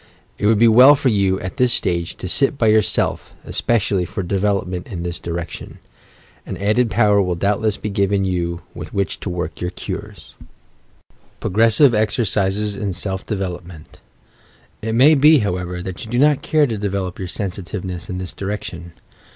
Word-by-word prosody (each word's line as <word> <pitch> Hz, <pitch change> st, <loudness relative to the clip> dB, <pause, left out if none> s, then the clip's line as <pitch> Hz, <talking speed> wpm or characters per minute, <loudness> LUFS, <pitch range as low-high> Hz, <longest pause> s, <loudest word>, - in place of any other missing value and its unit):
It 105 Hz, -, +1 dB
would 110 Hz, 0 st, +4 dB
be 115 Hz, +2 st, +5 dB
well 125 Hz, +6 st, +8 dB
for 135 Hz, -1 st, +1 dB
you, 100 Hz, -3 st, +1 dB
at 95 Hz, +7 st, -6 dB
this 125 Hz, -2 st, +3 dB
stage, 85 Hz, -2 st, -1 dB
to -, -, -6 dB
sit 135 Hz, +8 st, +1 dB
by 110 Hz, -4 st, +3 dB
yourself 110 Hz, -1 st, +1 dB
especially 100 Hz, -5 st, 0 dB
for 90 Hz, +3 st, -4 dB
development 95 Hz, -1 st, -1 dB
in 90 Hz, -7 st, -6 dB
this 85 Hz, -1 st, -3 dB
direction; 85 Hz, -2 st, -6 dB, 0.7 s
and -, -, -6 dB
added 110 Hz, +4 st, +2 dB
power 105 Hz, -1 st, +3 dB
will 90 Hz, -2 st, -1 dB
doubtless 105 Hz, +3 st, 0 dB
be 105 Hz, -, -5 dB
given 100 Hz, 0 st, +1 dB
you 85 Hz, -2 st, -2 dB
with -, -, -9 dB
wliieh 100 Hz, -1 st, -2 dB
to -, -, -5 dB
work 90 Hz, -2 st, -4 dB
your 90 Hz, -, -1 dB
cures, -, -, -8 dB, 1.1 s
PROGRESSIVE 115 Hz, +6 st, +4 dB
EXERCISES 105 Hz, -1 st, 0 dB
IN 100 Hz, -1 st, -3 dB
SELF 95 Hz, +1 st, -4 dB
DEVELOPMENT 90 Hz, -5 st, -6 dB, 0.8 s
It 110 Hz, +1 st, -2 dB
may 140 Hz, +6 st, +6 dB
be, 150 Hz, +2 st, +6 dB
however, 90 Hz, -5 st, -2 dB
that 95 Hz, -1 st, -6 dB
you 110 Hz, -, -9 dB
do 120 Hz, -, -1 dB
not 145 Hz, +1 st, +4 dB
care 155 Hz, -2 st, +2 dB
to 115 Hz, -6 st, -3 dB
develop 95 Hz, -3 st, -3 dB
your 95 Hz, -, -4 dB
sensitiveness 90 Hz, -2 st, -5 dB
in 90 Hz, -, -4 dB
this 90 Hz, -2 st, -5 dB
direction. 95 Hz, -4 st, -6 dB
100 Hz, 165 wpm, -20 LUFS, 90-110 Hz, 1.1 s, well